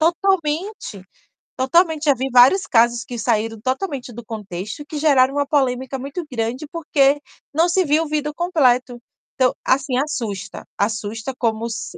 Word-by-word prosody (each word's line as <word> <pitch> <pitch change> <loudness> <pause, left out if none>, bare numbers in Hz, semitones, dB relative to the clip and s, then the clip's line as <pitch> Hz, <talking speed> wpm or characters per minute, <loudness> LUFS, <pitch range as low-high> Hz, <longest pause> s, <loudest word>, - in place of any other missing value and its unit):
Totalmente, 340 - 0 0.5
totalmente. 320 +4 +2
Já 285 -2 +4
vi 265 +2 -3
vários 255 +11 +6
casos 235 -5 +3
que 245 - -7
saíram 225 -1 0
totalmente 260 - -3
do 240 0 -10
contexto 210 - -6
que 305 - -7
geraram 275 -3 +3
uma 285 0 +1
polêmica 265 -2 0
muito 280 +6 -5
grande, 240 +4 -3
porque 290 -3 +2 0.3
não 330 +3 +3
se 365 +1 +2
viu 305 +3 +2
o - - -5
vídeo 300 0 -2
completo, 255 -8 +1 0.4
então, 255 -1 +2
assim, 260 -1 +1
assusta, 230 -9 -4
assusta 220 +3 -2
como 225 -2 -1
s 225 - -6
265 Hz, 150 wpm, -20 LUFS, 235-305 Hz, 0.5 s, vários